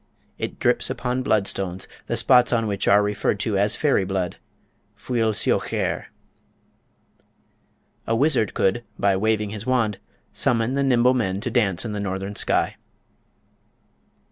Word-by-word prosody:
It -, -, -4 dB
drips -, -, +1 dB
upon 125 Hz, +1 st, -2 dB
blood 110 Hz, -5 st, +1 dB
stones, 95 Hz, -1 st, -4 dB, 0.2 s
the -, -, -1 dB
spots 125 Hz, -2 st, +4 dB
on 115 Hz, -2 st, +1 dB
which 100 Hz, -2 st, -2 dB
are 100 Hz, +1 st, +5 dB
referred 105 Hz, 0 st, -1 dB
to 110 Hz, -, -1 dB
as 100 Hz, +1 st, +1 dB
fairy 145 Hz, -9 st, +2 dB
blood 95 Hz, -1 st, -3 dB, 0.6 s
(fuil 115 Hz, -3 st, 0 dB
siochaire). -, -, 0 dB, 2.0 s
A 115 Hz, -, +1 dB
wizard 130 Hz, -5 st, +1 dB
could, 95 Hz, +5 st, +1 dB
by 100 Hz, -1 st, +2 dB
waving 105 Hz, +1 st, 0 dB
his 110 Hz, +2 st, -7 dB
wand, 115 Hz, -6 st, +1 dB, 0.3 s
summon 115 Hz, +1 st, +1 dB
the 140 Hz, -, 0 dB
"Nimble 125 Hz, -2 st, +3 dB
Men" 100 Hz, -7 st, -1 dB
to 120 Hz, -, -3 dB
dance 105 Hz, -5 st, +1 dB
in 110 Hz, -, -3 dB
the 105 Hz, -, -4 dB
northern 95 Hz, 0 st, -4 dB
sky. -, -, 0 dB
110 Hz, 140 wpm, -23 LUFS, 100-125 Hz, 2.0 s, are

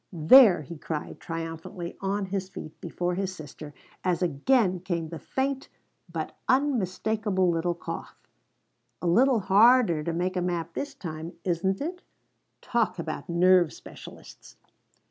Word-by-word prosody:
"There!" 175 Hz, -, +7 dB
he 150 Hz, +3 st, -9 dB
cried, 150 Hz, -1 st, -5 dB
triumphantly 165 Hz, +2 st, -6 dB
on 195 Hz, +1 st, -1 dB
his 190 Hz, 0 st, -3 dB
feet 180 Hz, -5 st, -10 dB
before 175 Hz, 0 st, -2 dB
his 190 Hz, 0 st, -3 dB
sister, 150 Hz, -1 st, -10 dB, 0.3 s
as 180 Hz, -1 st, 0 dB
again 180 Hz, -, +2 dB
came 170 Hz, -3 st, -3 dB
the 165 Hz, -1 st, -7 dB
faint 270 Hz, -, -2 dB, 0.4 s
but -, -, -4 dB
unmistakable 215 Hz, -7 st, +1 dB
little 170 Hz, +1 st, -1 dB
cough. -, -, -7 dB, 0.8 s
"A -, -, -6 dB
little 235 Hz, +7 st, +4 dB
harder 205 Hz, -4 st, +5 dB
to 170 Hz, -, -2 dB
make 180 Hz, +3 st, -1 dB
a 180 Hz, -, 0 dB
map 170 Hz, -2 st, -2 dB
this 285 Hz, -1 st, -5 dB
time, 165 Hz, -, -7 dB
isn't 190 Hz, +2 st, 0 dB
it? 355 Hz, +5 st, -4 dB, 0.6 s
Talk 230 Hz, -5 st, 0 dB
about 165 Hz, -1 st, -5 dB
nerve 175 Hz, -1 st, +4 dB
specialists -, -, -13 dB
180 Hz, 135 wpm, -27 LUFS, 170-205 Hz, 0.8 s, There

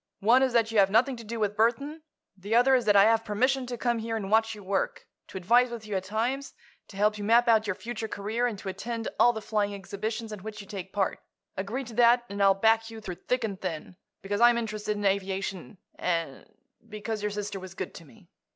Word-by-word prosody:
One 235 Hz, +6 st, +5 dB
is 260 Hz, -2 st, +2 dB
that 225 Hz, -1 st, +2 dB
you 220 Hz, -, +3 dB
have 195 Hz, -1 st, +5 dB
nothing 245 Hz, +6 st, +3 dB
to 230 Hz, -, -9 dB
do 225 Hz, +1 st, -5 dB
with 210 Hz, -1 st, 0 dB
Burthon. 260 Hz, +8 st, 0 dB, 0.3 s
The 200 Hz, +4 st, -2 dB
other 250 Hz, +3 st, +5 dB
is 250 Hz, -3 st, +3 dB
that 205 Hz, -1 st, +4 dB
I 200 Hz, -, +8 dB
have 225 Hz, +1 st, +3 dB
permission 255 Hz, +5 st, 0 dB
to 245 Hz, 0 st, -4 dB
come 235 Hz, -1 st, 0 dB
here 225 Hz, 0 st, -3 dB
and 200 Hz, -2 st, -5 dB
watch 225 Hz, 0 st, +3 dB
your 205 Hz, -, -12 dB
work; 195 Hz, +1 st, -2 dB, 0.2 s
to -, -, -8 dB
advise 240 Hz, +7 st, +4 dB
with 235 Hz, -2 st, -7 dB
you 210 Hz, -2 st, -4 dB
at 190 Hz, 0 st, -2 dB
times; 240 Hz, +7 st, -2 dB, 0.3 s
to 195 Hz, -, -12 dB
help 210 Hz, +1 st, +2 dB
you -, -, -4 dB
map 235 Hz, +3 st, +4 dB
out 220 Hz, -2 st, +4 dB
your 205 Hz, -, -1 dB
future 230 Hz, 0 st, -5 dB
career 220 Hz, +4 st, -2 dB
and 225 Hz, -4 st, -4 dB
to 195 Hz, -, -6 dB
attend 225 Hz, +4 st, -4 dB
all 240 Hz, -, +6 dB
the 220 Hz, -2 st, -7 dB
flying 205 Hz, -1 st, -1 dB
exhibitions 215 Hz, +3 st, -5 dB
in 210 Hz, -, -7 dB
which 215 Hz, +1 st, -7 dB
you 200 Hz, -, -8 dB
take 195 Hz, -3 st, -7 dB
part. 195 Hz, -2 st, -1 dB, 0.4 s
Agree 210 Hz, +8 st, -3 dB
to 240 Hz, -2 st, -10 dB
that, 240 Hz, +1 st, +5 dB
and 200 Hz, 0 st, -4 dB
I'll 195 Hz, -1 st, +5 dB
back 225 Hz, +2 st, +2 dB
you 225 Hz, -1 st, -9 dB
through 195 Hz, -4 st, -6 dB
thick 250 Hz, -1 st, +1 dB
and 200 Hz, -4 st, -4 dB
thin, 180 Hz, -1 st, -5 dB, 0.3 s
because 205 Hz, +2 st, -2 dB
I'm 240 Hz, 0 st, +6 dB
interested 215 Hz, -2 st, -3 dB
in 205 Hz, -, -3 dB
aviation 195 Hz, +1 st, -2 dB, 0.2 s
and—because 210 Hz, -, -5 dB
your 210 Hz, -, -1 dB
sister 205 Hz, -1 st, -4 dB
was 185 Hz, 0 st, -10 dB
good 185 Hz, -, -5 dB
to -, -, -11 dB
me." 200 Hz, +2 st, -19 dB
215 Hz, 235 wpm, -28 LUFS, 200-235 Hz, 0.4 s, I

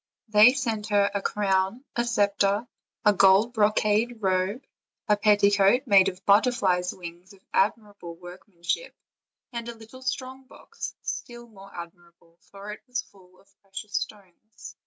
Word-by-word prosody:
They 215 Hz, +4 st, +7 dB
sent 225 Hz, -6 st, -2 dB
her 205 Hz, -1 st, +2 dB
a 200 Hz, -, -1 dB
crown, 195 Hz, +5 st, 0 dB
a 240 Hz, -, +1 dB
scepter, 205 Hz, -1 st, +1 dB, 0.4 s
a 210 Hz, -, +6 dB
golden 195 Hz, +4 st, +5 dB
bro 215 Hz, -3 st, +3 dB
cade 215 Hz, +3 st, 0 dB
robe, 190 Hz, +5 st, -1 dB, 0.4 s
a 210 Hz, -, +4 dB
petticoat 205 Hz, +3 st, +3 dB
made 195 Hz, -4 st, +5 dB
of 185 Hz, 0 st, -12 dB
butterflies' 200 Hz, -4 st, +3 dB
wings 175 Hz, +1 st, -11 dB
of 190 Hz, -, -22 dB
ad 200 Hz, -, +3 dB
mirable 200 Hz, -6 st, -12 dB
workmanship, 175 Hz, -, -5 dB, 0.6 s
and 235 Hz, -1 st, -5 dB
a 235 Hz, -, -7 dB
little 225 Hz, +3 st, -14 dB
strong 260 Hz, +1 st, -5 dB
box, 460 Hz, -, -9 dB
still 240 Hz, 0 st, -6 dB
more 195 Hz, -4 st, -15 dB
admirable, 170 Hz, -1 st, -13 dB
for 200 Hz, +1 st, -9 dB
it 210 Hz, -, -9 dB
was 250 Hz, -2 st, -3 dB
full 185 Hz, -2 st, -22 dB
of 195 Hz, 0 st, -27 dB
precious 195 Hz, +1 st, -9 dB
stones. 205 Hz, +2 st, -7 dB
205 Hz, 150 wpm, -26 LUFS, 190-225 Hz, 0.6 s, They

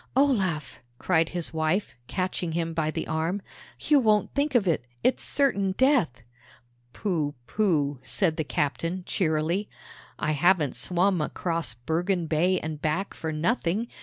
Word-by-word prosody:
"Olaf!" 195 Hz, -, +1 dB, 0.2 s
cried 165 Hz, 0 st, +2 dB
his 175 Hz, -2 st, -2 dB
wife, 160 Hz, +5 st, 0 dB
catching 185 Hz, -3 st, -2 dB
him 165 Hz, 0 st, -1 dB
by 160 Hz, -1 st, 0 dB
the -, -, -3 dB
arm, 165 Hz, +5 st, -1 dB, 0.4 s
"you 295 Hz, -2 st, +4 dB
won't 215 Hz, -4 st, +2 dB
think 285 Hz, -1 st, 0 dB
of 215 Hz, -6 st, +3 dB
it! 160 Hz, -7 st, +1 dB, 0.2 s
It's 255 Hz, -, +2 dB
certain 200 Hz, -9 st, +1 dB
death!" 245 Hz, -, +2 dB, 0.7 s
"Pooh, 155 Hz, -, -2 dB
pooh!" 150 Hz, -, +1 dB
said 175 Hz, -6 st, +1 dB
the 160 Hz, -, 0 dB
captain, 165 Hz, +6 st, -2 dB
cheerily. 165 Hz, +3 st, 0 dB, 0.5 s
"I 155 Hz, -, -1 dB
haven't 155 Hz, -1 st, +3 dB
swum 180 Hz, 0 st, +2 dB
across 165 Hz, -5 st, -2 dB
Bergen 170 Hz, +8 st, -1 dB
Bay 175 Hz, +4 st, +2 dB
and 155 Hz, -1 st, -5 dB
back 165 Hz, +6 st, -1 dB
for 160 Hz, -, -4 dB
nothing. 185 Hz, +6 st, 0 dB
170 Hz, 140 wpm, -26 LUFS, 155-195 Hz, 0.7 s, you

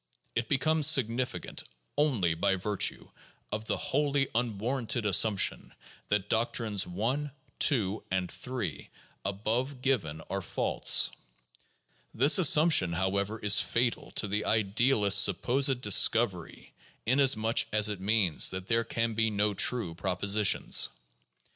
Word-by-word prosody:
It 120 Hz, 0 st, -3 dB
becomes 155 Hz, +2 st, +2 dB
significant 125 Hz, -4 st, 0 dB, 0.3 s
only 125 Hz, -, +1 dB
by 95 Hz, +4 st, 0 dB
virtue 100 Hz, +2 st, -2 dB, 0.4 s
of 110 Hz, +1 st, -4 dB
the -, -, -2 dB
wholly 140 Hz, -1 st, -1 dB
unwarranted 120 Hz, +1 st, -2 dB
assumption 105 Hz, 0 st, +1 dB, 0.3 s
that 105 Hz, -1 st, -1 dB
doctrines 110 Hz, -3 st, -1 dB
1, 120 Hz, +11 st, -3 dB, 0.3 s
2, 110 Hz, -, 0 dB
and 95 Hz, -1 st, -2 dB
3, 120 Hz, -, -6 dB, 0.3 s
above 115 Hz, +7 st, -3 dB
given, 90 Hz, -, -1 dB
are 100 Hz, 0 st, -4 dB
false. -, -, +1 dB, 1.0 s
This 140 Hz, +10 st, +5 dB
assumption, 155 Hz, -, +4 dB
however, 100 Hz, +4 st, -2 dB
is 105 Hz, -2 st, +4 dB
fatal 120 Hz, 0 st, -1 dB
to 105 Hz, -, -1 dB
the 105 Hz, +2 st, -2 dB
idealist's 110 Hz, 0 st, +2 dB
supposed 130 Hz, +6 st, +1 dB
discovery, 105 Hz, -3 st, +1 dB, 0.3 s
inasmuch 115 Hz, -3 st, +2 dB
as 105 Hz, 0 st, +2 dB
it 105 Hz, -3 st, -5 dB
means 100 Hz, -5 st, +2 dB
that 95 Hz, 0 st, -6 dB
there 115 Hz, +2 st, 0 dB
can 115 Hz, 0 st, -2 dB
be 110 Hz, 0 st, 0 dB
no 105 Hz, 0 st, 0 dB
true 100 Hz, -3 st, +1 dB
propositions. 100 Hz, +4 st, +1 dB
110 Hz, 115 wpm, -28 LUFS, 100-125 Hz, 1.0 s, This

